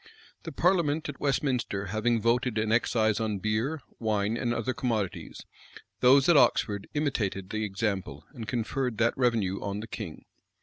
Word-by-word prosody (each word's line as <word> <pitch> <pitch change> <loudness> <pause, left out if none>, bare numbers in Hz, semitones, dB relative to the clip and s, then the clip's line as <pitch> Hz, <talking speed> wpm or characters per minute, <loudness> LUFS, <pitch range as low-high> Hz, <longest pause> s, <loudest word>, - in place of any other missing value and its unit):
The 165 - -7
parliament 160 -2 +1
at 140 - -7
Westminster 130 -8 0
having 110 +4 0
voted 120 +1 +1
an 110 0 0
excise 110 -1 +2
on 110 -2 -1
beer, 110 +10 -1 0.2
wine, 110 -1 0
and 120 0 -1
other 120 +2 -1
commodities, 115 -7 -3 0.5
those 135 +2 +6
at 170 - +6
Oxford 105 -6 +3
imitated 105 -10 -1
the 110 0 -2
example, 100 -1 -3
and 110 -2 -7
conferred 120 +1 -2
that 115 0 +2
revenue 115 -7 +1
on 100 0 -3
the 110 - -6
king. 115 - -7
115 Hz, 150 wpm, -28 LUFS, 105-130 Hz, 0.5 s, those